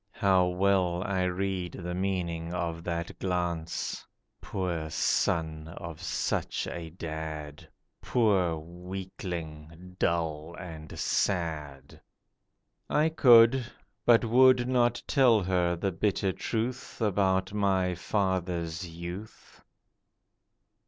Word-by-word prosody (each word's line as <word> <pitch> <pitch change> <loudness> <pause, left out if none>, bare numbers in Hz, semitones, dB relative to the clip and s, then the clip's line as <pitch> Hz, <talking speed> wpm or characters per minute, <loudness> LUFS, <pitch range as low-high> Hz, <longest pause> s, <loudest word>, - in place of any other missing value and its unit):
How 95 -2 +3
well 90 -1 +1
I 95 -3 0
read 90 -1 -2
the 90 -1 -5
meaning 90 -3 -2
of 85 -1 -3
that 85 -1 -4
glance— 85 -3 -2 0.4
'Poor 85 -5 -3
son 80 0 0
of 85 -1 -7
such 85 - -1
a 85 -2 -6
dad; 80 -3 -6 0.3
Poor 100 -8 +2
weakling, 90 -1 -7
dull 80 -1 -1
and 80 -4 -9
sad.' 75 -7 -2 0.9
I 155 +2 +3
could, 125 -4 +6 0.4
but 120 0 +5
would 125 +1 +5
not 120 -2 +2
tell 120 -7 +4
her 90 -1 +1
bitter 95 +2 0
truth 120 +6 -3
About 95 -3 +1
my 95 -3 +1
father's 90 -3 -1
youth. 85 +5 -9
90 Hz, 95 wpm, -29 LUFS, 85-100 Hz, 0.9 s, could